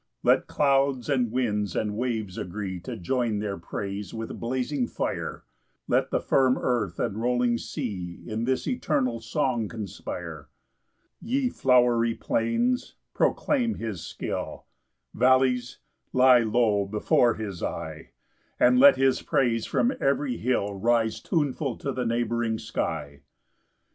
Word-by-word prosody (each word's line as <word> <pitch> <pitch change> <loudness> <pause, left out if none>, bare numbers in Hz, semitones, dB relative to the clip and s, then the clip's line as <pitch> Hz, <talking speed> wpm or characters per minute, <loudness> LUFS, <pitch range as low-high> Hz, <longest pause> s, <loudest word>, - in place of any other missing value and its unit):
5 - - -5
Let - - +4
clouds, 135 -2 +1
and 125 -5 +1
winds, 105 -6 -1
and 105 -1 -1
waves 110 -5 -2
agree 95 0 -4
To 85 - -7
join 115 +3 0
their 100 -2 -3
praise 100 +5 -5
with 115 0 -6
blazing 125 +2 -1
fire; - - -4 0.4
Let - - +2
the - - +1
firm 130 -1 +3
earth, 105 -8 -1
and 105 +3 -2
rolling 120 -1 +1
sea, 95 - -5
In 110 0 -3
this 130 +1 -1
eternal 140 - 0
song 115 0 -1
conspire. 105 -5 -7 0.7
6 - - -11
Ye 260 0 +1
flowery 120 - +3
plains, 240 - 0 0.2
proclaim 245 -6 +1
his 110 -7 -5
skill; - - -5 0.5
Vallies, 130 +1 +2 0.4
lie 130 -1 +7
low 110 -3 +2
before 110 +3 +2
his 100 -6 -6
eye; - - -5 0.5
And 125 0 +5
let 140 +1 +8
his 135 0 +2
praise 115 -4 +1
from 245 +3 +1
every 135 -3 +1
hill 105 -4 0
Rise 115 +2 +1
tuneful 145 -5 -1
to 140 - -3
the 125 -2 -2
neighbouring 115 -1 0
sky. 70 -8 -4
120 Hz, 135 wpm, -26 LUFS, 105-130 Hz, 0.7 s, let